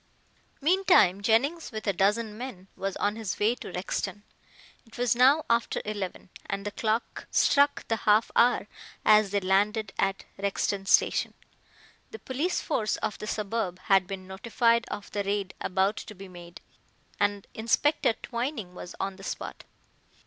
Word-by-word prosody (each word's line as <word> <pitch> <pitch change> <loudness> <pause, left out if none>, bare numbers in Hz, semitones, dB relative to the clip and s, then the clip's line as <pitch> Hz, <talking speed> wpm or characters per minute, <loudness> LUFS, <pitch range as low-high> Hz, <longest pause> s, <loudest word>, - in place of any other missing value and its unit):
Meantime, 325 - +4
Jennings, 270 +11 +1
with 215 -2 -6
a 200 - +1
dozen 210 +4 +1
men, 215 -6 -8
was 195 -1 -3
on 205 +1 0
his 220 -4 -3
way 215 +3 +3
to 245 - -9
Rexton. 190 +2 -3 0.6
It 225 - -15
was 245 -1 +2
now 270 +6 +5
after 235 0 +1
eleven, 200 -4 -5 0.2
and 195 +1 -4
the 205 - -2
clock 220 +2 -2
struck 285 0 +3
the 225 - 0
half 215 +1 +3
hour 240 -3 +4 0.4
as 215 -1 +6
they 200 +1 +1
landed 200 +2 +1
at 195 0 0
Rexton 200 0 -1
Station. - - +3 0.7
The 445 - -8
police 305 - -2
force 220 -9 -1
of 210 - -3
the 210 - -6
suburb 210 -4 -2 0.2
had 190 -2 +5
been 190 -1 -6
notified 230 +4 +1
of 205 - -6
the 205 - -1
raid 200 -1 -2
about 195 +3 +1
to 210 - -8
be 195 +1 -10
made, 175 -1 -12 0.6
and 205 -1 +1
Inspector 240 +6 +2
Twining 235 -6 -4
was 180 0 -9
on 195 -1 -3
the 195 - -12
spot. - - -6
210 Hz, 155 wpm, -28 LUFS, 195-235 Hz, 0.7 s, as